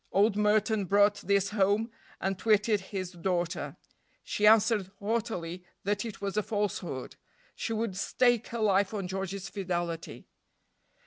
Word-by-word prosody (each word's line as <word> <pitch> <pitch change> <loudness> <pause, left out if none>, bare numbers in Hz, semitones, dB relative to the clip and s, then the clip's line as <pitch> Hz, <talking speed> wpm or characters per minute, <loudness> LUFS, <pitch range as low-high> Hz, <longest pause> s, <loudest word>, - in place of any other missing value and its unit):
Old 205 +2 +3
Merton 210 0 +2
brought 205 +2 +4
this 200 -1 +2
home 205 +3 +2 0.3
and 195 0 -1
twitted 210 +2 +3
his 185 -3 -4
daughter. 175 0 -2 0.5
She 210 - +1
answered 215 -2 +5
haughtily 200 -5 -3 0.2
that 200 0 0
it 225 - -6
was 200 -1 -3
a - - +4
falsehood. 205 - -3 0.4
She - - -3
would 220 -3 -1
stake 240 +4 +2
her 235 - -5
life 200 0 +2
on 195 -3 -3
George's 190 +1 -4
fidelity. 175 -4 -4
200 Hz, 135 wpm, -29 LUFS, 190-215 Hz, 0.5 s, answered